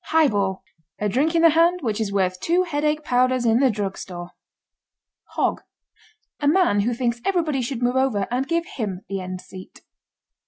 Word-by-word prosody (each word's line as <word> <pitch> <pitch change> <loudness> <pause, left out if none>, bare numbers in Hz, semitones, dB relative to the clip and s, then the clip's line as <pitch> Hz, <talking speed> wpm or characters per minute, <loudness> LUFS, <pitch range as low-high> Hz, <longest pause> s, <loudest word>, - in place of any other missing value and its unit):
HIGHBALL. 205 -12 +1 0.3
A 210 - -1
drink 280 - +1
in 330 - +3
the 330 - +7
hand 340 +3 +3
which 220 -2 -1
is 205 -2 -2
worth 185 -2 0
two 345 - +2
headache 305 -2 -1
powders 255 -1 +1
in 230 +1 +4
the 270 -1 +4
drugstore. 190 -4 -5 1.0
HOG. - - 0 0.8
A 290 - 0
man 315 - +3
who 235 +4 0
thinks 235 -1 -1
everybody 325 -8 0
should 245 0 -3
move 245 +1 +1
over 260 -7 +1
and 255 +2 -1
give 335 0 0
him 200 - -5
the 195 -1 -4
end 185 0 -6
seat. 185 0 -12
245 Hz, 170 wpm, -23 LUFS, 200-305 Hz, 1.0 s, the